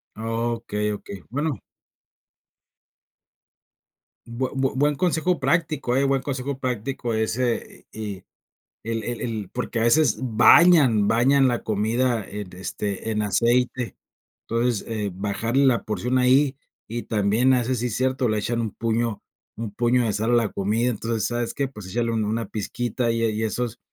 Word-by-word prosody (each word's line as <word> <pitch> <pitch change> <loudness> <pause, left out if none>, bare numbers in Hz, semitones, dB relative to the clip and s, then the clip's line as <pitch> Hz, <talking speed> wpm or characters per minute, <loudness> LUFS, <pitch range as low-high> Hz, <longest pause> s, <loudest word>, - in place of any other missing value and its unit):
Okey, 115 -2 -2
okey. 100 -2 -8
Bueno. 145 +2 -2 2.7
Bue 120 +2 -3
bue 135 -1 0
buen 145 +2 +2
consejo 175 +2 +1
práctico, 155 -7 0
eh, 135 - +3
buen 135 -1 +2
consejo 135 0 -3
práctico 125 -1 -3
ese 115 +2 -2
y 105 -3 -6 0.6
y 115 - -4
el 115 -1 -2
el 120 +1 -4
el 110 -5 -4
porque 125 -1 -3
a - - 0
veces 125 0 +4
bañan 125 - +6
bañan 135 +4 +4
la 120 -2 -1
comida 110 +2 0
en, 100 -2 -7
este, 100 +3 -4
en 105 0 0
aceite. 120 +3 +1 0.5
Entonces, 115 -1 0
eh, 105 -3 -2
bajarle 110 +8 0
la 125 -3 +3
porción 120 +4 -1
ahí 130 +2 +4 0.3
y 120 +1 -4
también, 110 +4 +2
a 125 - +4
veces, 125 0 -1
sí 125 - -1
es 115 - -4
cierto, 130 -1 +1
le 110 - +1
echan 115 +3 -1
un 110 -3 -3
puño 115 -1 -1 0.4
un 110 -2 -4
puño 120 +2 +2
de 110 - 0
sal 110 +3 0
a - - +3
la 115 -3 +2
comida. 110 +5 0
Entonces, 115 0 -2
¿sabes 120 -1 -2
qué?, 140 - -1
pues, 105 -8 -10
échale 115 +3 -1
un 110 -1 0
una 115 +2 -1
pizquita 120 +3 -2
y, 115 0 -1
eh, 115 - +2
y 110 +1 -2
esos, 115 +1 -2
115 Hz, 165 wpm, -24 LUFS, 110-130 Hz, 2.7 s, bañan